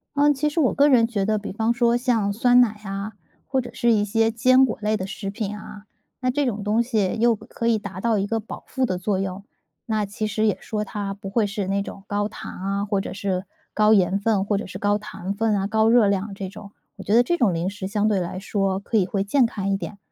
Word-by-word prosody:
呃， 290 +1 +4
其 300 +2 0
实 325 - -2
我 270 - +3
个 285 +1 +4
人 235 -5 +5
觉 205 -5 -1
得 215 +1 +1
比 205 - -5
方 225 +3 0
说 235 -1 +2
像 230 -5 +1
酸 245 +3 +4
奶 215 -3 +1
啊， 200 +2 -5 0.3
或 265 -1 +1
者 - - -8
是 235 - +2
一 205 - +2
些 225 +2 +1
坚 255 +3 +5
果 235 - -3
类 215 +1 +1
的 185 - -4
食 195 +1 -5
品 210 0 -4
啊， 210 -1 -10 0.4
那 255 -1 0
这 290 +1 0
种 215 -4 -2
东 215 +3 +2
西 220 -5 0
又 235 -1 +4
可 230 +2 -5
以 230 - +3
达 200 -3 -7
到 230 -1 +2
一 195 - 0
个 225 +2 -1
保 220 - -9
护 260 -1 +1
的 185 -5 -2
作 190 +1 -1
用。 195 +1 -4 0.4
那 215 -2 0
其 215 +2 -3
实 215 +1 0
也 210 - +2
说 210 -1 -3
它 200 -1 -4
不 195 0 -8
会 210 +1 +1
是 200 -2 -3
那 200 +1 0
种 195 - -8
高 205 0 0
糖 - - -8
啊， 195 +2 -2
或 200 -1 0
者 - - -6
是 190 -1 -2 0.3
高 215 0 +4
盐 190 0 +3
分， 200 -2 +1
或 205 -1 +1
者 - - -4
是 - - -7
高 205 0 +1
糖 200 -2 -6
分 220 0 +1
啊， 195 0 0
高 220 +1 +3
热 230 -3 +5
量 200 +1 -1
这 195 -2 -5
种。 205 0 -11 0.3
我 195 - -8
觉 205 - -1
得 240 - +6
这 345 +7 0
种 220 -8 +3
零 170 +3 -1
食 200 -1 -6
相 210 +1 0
对 205 -3 +2
来 180 +1 -4
说 195 -1 -1
可 220 +3 -1
以 190 - +3
会 195 +1 -1
健 245 +5 +3
康 200 -3 -3
一 195 - +1
点， 195 +2 -7
210 Hz, 280 characters per minute, -23 LUFS, 195-230 Hz, 0.4 s, 得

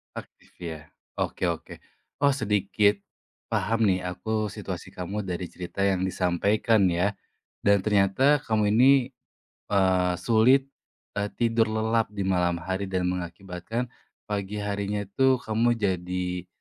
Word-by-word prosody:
Aktif, - - -11
ya. 80 -3 -6 0.3
Oke - - -1
oke. - - -6 0.4
Oh, 140 - +5
sedikit 105 -4 +1 0.5
paham 115 +4 0
nih 90 -1 0
aku 110 +4 -2
situasi - - -7
kamu 100 +3 -4
dari 90 -1 -4
cerita 90 +2 -6
yang 95 -2 +2
disampaikan 100 +4 +2
ya, 90 +4 +1 0.5
dan 100 -1 +5
ternyata 105 +8 +3
kamu 110 -2 +2
ini, 130 +2 +5 0.6
eee, 95 -2 +3
sulit, 125 +4 +4 0.5
eee, 100 0 0
tidur 115 -1 +2
lelap 110 +1 +1
di 100 - -2
malam 90 -2 +1
hari 95 +2 -2
dan 90 -1 -1
mengakibatkan 90 +6 -5 0.4
pagi 105 0 -3
harinya 100 0 -2
itu 130 +7 +2
kamu 115 +2 +2
jadi, 90 -3 -2
100 Hz, 125 wpm, -26 LUFS, 90-110 Hz, 0.6 s, Oh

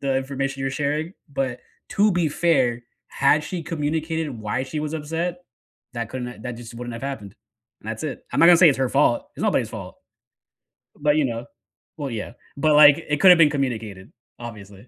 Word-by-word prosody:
the 135 -1 0
information 135 0 -3
you're 135 0 -1
sharing, 150 +5 -2 0.2
but 135 -2 -2 0.3
to 210 +1 +3
be 175 -3 +1
fair, 130 -7 +1 0.2
had 150 +2 +2
she 180 -3 -5
communicated 160 0 -2
why 115 +2 -3
she 150 +3 -4
was 150 +1 -3
upset, 165 +3 -3 0.5
that 115 -2 -4
couldn't, 125 -1 -5
uh 125 - -10
that 125 - -4
just 120 -1 -10
wouldn't 120 0 -6
have 115 +2 -8
happened, 110 -8 -6 0.5
and 110 - -10
that's 110 +4 -5
it. 150 -4 -5
I'm - - +1
not 165 - +8
gonna 175 -1 +8
say 175 - +8
it's 135 - +2
her 130 - +1
fault, 135 -2 +1
it's - - -5
nobody's - - +1
fault, - - -8 1.0
but, 150 +1 +2
you 150 - +3
know 115 -1 -4 0.5
Well, 140 -2 -4
yeah, 110 +1 -5 0.2
but, 150 +1 +3
like, 150 +1 +7
it 150 0 0
coulda 180 -2 +9
been 155 -3 +6
communicated 115 -8 -4 0.3
obviously. 105 -2 -10
140 Hz, 195 wpm, -23 LUFS, 120-155 Hz, 1.0 s, coulda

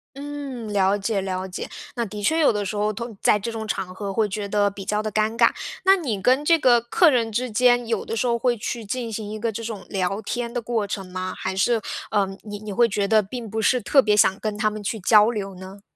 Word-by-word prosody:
嗯， 275 -6 -6
了 195 0 +3
解 200 0 -1
了 190 0 -3
解。 180 - -6 0.3
那 235 -1 -1
的 210 0 -7
确 320 +10 +2
有 290 -7 +4
的 205 0 -1
时 200 +2 -4
候， 210 +1 0
同 230 0 -7
在 210 - +3
这 230 +4 -4
种 220 -1 -5
场 185 -3 -3
合 200 -1 -4
会 215 -1 +1
觉 205 0 -4
得 205 0 +2
比 195 -1 -9
较 210 +1 0
的 215 0 -4
尴 215 +2 0
尬。 230 0 +5 0.4
那 385 +1 +7
你 240 - -3
跟 260 +6 +3
这 335 0 +5
个 245 -4 +5
客 315 +8 +4
人 230 -4 +1
之 250 +3 -1
间， 245 +1 +3
有 225 -3 -1
的 225 - -3
时 245 - 0
候 235 0 +2
会 245 0 +1
去 225 +1 -4
进 235 +1 -3
行 215 -1 -5
一 215 - -5
个 230 0 -1
这 230 +2 -6
种 220 -4 -6
聊 195 +2 -1
天 235 +2 -4
的 245 - -2
过 225 -3 -1
程 200 -1 -4
吗？ 185 0 -4
还 190 0 -4
是， 225 +3 +2 0.3
呃， 200 -2 +2 0.2
你 205 -1 -7
你 215 -1 -7
会 235 +4 +4
觉 200 -1 -1
得 215 -1 +4
并 230 +2 -7
不 220 +1 -3
是 250 +3 +2
特 270 +6 +4
别 210 -1 +3
想 195 -1 +4
跟 215 -1 -3
他 215 0 +2
们 210 0 -7
去 220 +2 -3
交 210 +4 +5
流 195 -4 -5
呢？ 190 +2 -11
215 Hz, 280 characters per minute, -23 LUFS, 200-235 Hz, 0.4 s, 那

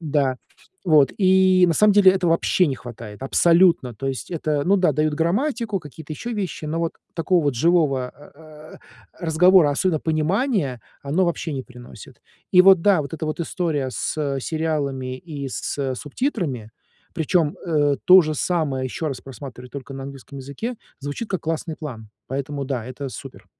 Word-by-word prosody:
Да, 145 -5 0 0.5
вот, 150 -6 +4
и, 185 -1 +5
на 170 - +2
самом 210 +5 +5
деле, 200 -2 +7
этого 180 -3 0
вообще 170 +2 +2
не 140 - -1
хватает, 115 -3 -10
абсолютно. 165 -3 +3
То 135 +6 -6
есть 135 -1 -4
это, 155 -4 -1
ну 195 +5 +4
да, 180 -5 +3
дают 155 +1 0
грамматику, 210 - 0
какие-то 155 +1 -10
еще 235 +10 -5
вещи, 190 -7 -4
но 160 +2 -2
вот 165 -1 -1 0.2
такого 175 +1 +1
вот 145 -2 +1
живого 140 -2 +2
а, 145 +3 -17
а, 155 0 -14
э, - - -19 0.5
разговора, 170 0 +5
особенно 155 +2 0
понимания, 160 - 0 0.2
оно 155 +7 +1
вообще 170 -2 -2
не 135 -2 -3
приносит. 120 -4 -13 0.3
И 180 - +8
вот, 190 -3 +6
да, 195 -4 +4
вот 140 +2 -7
эта 160 - -5
вот 155 +2 -3
история 160 -6 -2
с 140 +1 -2
сериалами 140 -4 -2
и 140 -1 -7
с 135 +1 -3
субтитрами, 145 - -3 0.4
причем, 160 -1 +1
э, 145 -4 +2
то 185 +1 +9
же 155 -1 -2
самое, 150 -5 -1
еще 145 +5 -4
раз 135 -4 -4
просматривать 125 -2 -10
только 140 -1 -8
на 135 - -6
английском 140 0 -9
языке, 140 - -5 0.2
звучит 145 +10 -5
как 190 -4 -1
классный 160 0 -3
план. 120 -9 -8 0.2
Поэтому 140 +1 -4
да. 130 -4 -3
Это 130 +3 -6
супер. 120 - -10
155 Hz, 175 wpm, -22 LUFS, 135-175 Hz, 0.5 s, то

